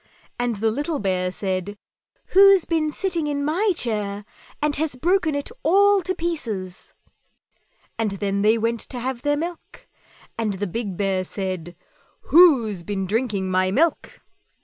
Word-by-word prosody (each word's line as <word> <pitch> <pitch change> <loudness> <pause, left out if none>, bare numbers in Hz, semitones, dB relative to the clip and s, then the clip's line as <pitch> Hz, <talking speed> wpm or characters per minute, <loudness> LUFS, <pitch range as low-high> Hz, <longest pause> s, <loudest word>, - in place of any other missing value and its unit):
and 240 -1 0
the 220 +2 0
little 295 +6 -2
Bear 185 -4 -1
said, 190 +1 -3 0.5
"Who's 390 -1 +6
been 320 -2 0
sitting 335 -2 -2
in 285 -1 -2
my 375 +8 +1
chair 210 -6 -2 0.3
and 300 -1 +1
has 305 -2 -1
broken 340 +2 +1
it 285 - -4
all 400 +4 +4
to 370 +1 -3
pieces?" 225 - -5 1.0
And 225 -2 +1
then 200 0 -2
they 215 +2 +4
went 230 +1 -1
to 250 - -7
have 250 0 -4
their 290 +1 +1
milk, 340 +2 -7 0.5
and 215 -3 0
the 195 +2 -3
big 200 -1 -4
Bear 195 -2 0
said, 185 -3 -5 0.5
"WHO'S 260 - +5
BEEN 195 +1 -3
DRINKING 205 -2 -1
MY 185 0 +2
MILK?" 310 - 0
235 Hz, 150 wpm, -23 LUFS, 195-315 Hz, 1.0 s, Who's